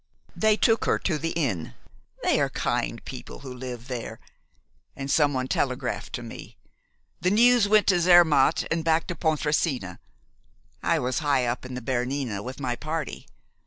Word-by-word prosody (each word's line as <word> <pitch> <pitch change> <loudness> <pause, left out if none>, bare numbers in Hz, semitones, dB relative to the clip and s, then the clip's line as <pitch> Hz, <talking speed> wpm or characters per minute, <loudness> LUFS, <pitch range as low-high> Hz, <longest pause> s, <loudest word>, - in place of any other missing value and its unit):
"They 215 -1 +3
took 225 0 +2
her - - +2
to 155 -5 -1
the 165 - -2
inn, 115 - -2 0.5
they - - +3
are - - +1
kind - - -2
people - - -9
who 130 -2 -8
live 125 -1 -7
there, 125 -3 -6 0.8
and 135 0 -4
someone 145 -4 +2
telegraphed 130 -1 -2
to 120 - -4
me. 115 - -10 0.6
The 180 - +1
news 235 +1 +5
went 215 0 +5
to 180 -3 +3
Zermatt, 170 -5 +5
and 165 0 0
back 160 0 +2
to 175 - -4
Pontresina. 150 - -1 0.8
I - - +2
was 125 +3 -1
high 140 -4 +1
up 120 +2 -3
in 130 - -7
the 125 - -6
Bernina 125 -3 -2
with 130 +5 -7
my 125 -3 -2
party. 155 +2 -5
140 Hz, 160 wpm, -26 LUFS, 125-165 Hz, 0.8 s, news